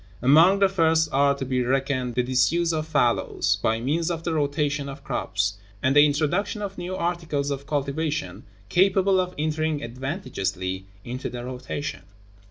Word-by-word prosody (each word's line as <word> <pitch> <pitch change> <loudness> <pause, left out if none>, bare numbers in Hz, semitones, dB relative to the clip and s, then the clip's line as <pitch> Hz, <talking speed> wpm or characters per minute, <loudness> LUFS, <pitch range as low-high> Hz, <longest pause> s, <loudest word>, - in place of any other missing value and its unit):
(1.) 125 +3 +3
Among 170 +6 +7
the 195 0 +5
first 160 -4 +2
are 140 +1 +3
to 135 - -4
be 130 -1 0
reckoned 130 -1 0
the 125 - +2
disuse 130 +7 +2
of 155 0 -2
fallows, 140 -7 +1
by 110 0 +1
means 160 +8 0
of 165 -1 -3
the 165 - -1
rotation 145 -1 0
of 140 +1 -9
crops; 100 -3 -2 0.2
and 130 +1 +2
the 145 - +8
introduction 170 +9 -1
of 195 -1 -5
new 180 +1 -5
articles 165 -5 -2
of 140 0 -5
cultivation 150 +1 -2 0.3
capable 190 - +3
of 180 0 -2
entering 155 0 -1
advantageously 95 - -4 0.2
into 125 +2 -5
the 120 0 -6
rotation. 130 +3 -5
145 Hz, 165 wpm, -25 LUFS, 130-165 Hz, 0.3 s, the